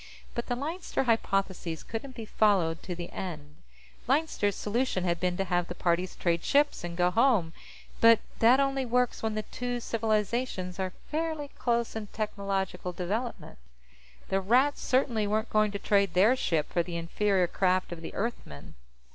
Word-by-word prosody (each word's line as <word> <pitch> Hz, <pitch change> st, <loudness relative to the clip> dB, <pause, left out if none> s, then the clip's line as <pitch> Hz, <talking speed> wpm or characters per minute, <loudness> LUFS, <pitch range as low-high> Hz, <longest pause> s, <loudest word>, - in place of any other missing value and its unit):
But 235 Hz, -, -4 dB
the 245 Hz, -, 0 dB
Leinster 315 Hz, +5 st, -2 dB
Hypothesis 195 Hz, -8 st, 0 dB
couldn't 250 Hz, +3 st, -6 dB
be 225 Hz, -, -6 dB
followed 190 Hz, -7 st, +2 dB
to 180 Hz, -, -5 dB
the 175 Hz, 0 st, -7 dB
end. 155 Hz, -5 st, -7 dB, 0.5 s
Leinster's 265 Hz, -, +1 dB
solution 220 Hz, -3 st, -1 dB
had 170 Hz, -2 st, 0 dB
been 180 Hz, -1 st, 0 dB
to 195 Hz, -, +1 dB
have 175 Hz, -2 st, 0 dB
the 175 Hz, -, -6 dB
parties 180 Hz, +1 st, 0 dB
trade 170 Hz, -1 st, 0 dB
ships 290 Hz, -7 st, +2 dB
and 170 Hz, -1 st, -5 dB
go 180 Hz, 0 st, +3 dB
home, 215 Hz, -7 st, +3 dB, 0.5 s
but 230 Hz, 0 st, +8 dB, 0.2 s
that 240 Hz, +4 st, +6 dB
only 275 Hz, -1 st, +1 dB
works 250 Hz, 0 st, +1 dB
when 220 Hz, -1 st, -1 dB
the 215 Hz, -, -2 dB
two 245 Hz, +2 st, -4 dB
civilizations 215 Hz, -4 st, -1 dB
are 185 Hz, -1 st, -2 dB, 0.2 s
fairly 310 Hz, -2 st, -2 dB
close 235 Hz, -3 st, -1 dB
in 220 Hz, -2 st, -4 dB
technological 195 Hz, -4 st, -3 dB
development. 200 Hz, -, -4 dB, 0.7 s
The 195 Hz, 0 st, +1 dB
Rats 255 Hz, +9 st, +3 dB
certainly 240 Hz, -5 st, +1 dB
weren't 215 Hz, +2 st, -1 dB
going 215 Hz, 0 st, +3 dB
to 200 Hz, -, -4 dB
trade 200 Hz, -2 st, +2 dB
their 210 Hz, +8 st, +5 dB
ship 160 Hz, -, -1 dB
for 175 Hz, -, +3 dB
the 170 Hz, 0 st, -4 dB
inferior 185 Hz, +3 st, +1 dB
craft 185 Hz, +1 st, +1 dB
of 170 Hz, -1 st, -6 dB
the 165 Hz, -, -8 dB
Earthmen. 200 Hz, -, -5 dB
205 Hz, 165 wpm, -29 LUFS, 180-240 Hz, 0.7 s, but